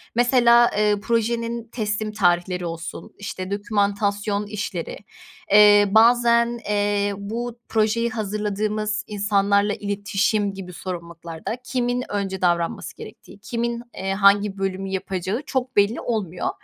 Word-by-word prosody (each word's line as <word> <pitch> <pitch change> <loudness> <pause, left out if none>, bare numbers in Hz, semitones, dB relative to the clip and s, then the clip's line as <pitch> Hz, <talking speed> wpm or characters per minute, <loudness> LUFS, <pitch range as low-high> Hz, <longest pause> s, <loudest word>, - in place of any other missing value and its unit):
Mesela, 240 -1 +5
eee, 210 0 +3
projenin 230 0 -1
teslim 215 -1 -2
tarihleri 180 -3 +1
olsun, 165 0 -7
işte, 190 -1 -6
dokümantasyon 205 0 0
işleri, 205 -5 -5 0.5
eee, 205 0 +7
bazen, 235 +1 +4
eee, 205 0 +1
bu 230 +4 -5
projeyi 225 +2 +1
hazırladığımız 210 0 -2
insanlarla 205 0 +1
iletişim 205 0 -1
gibi 185 -2 -8
sorumluluklarda 170 +3 -6
kimin 250 -1 -1
önce 195 -2 -3
davranması 170 -2 0
gerektiği, - - -12
kimin, 235 +3 -3
eee, 195 0 -2
hangi 200 0 +3
bölümü 195 0 -3
yapacağı 190 +3 -3
çok 260 -1 -2
belli 205 +3 +2
olmuyor. 195 -7 -2
205 Hz, 110 wpm, -23 LUFS, 195-230 Hz, 0.5 s, eee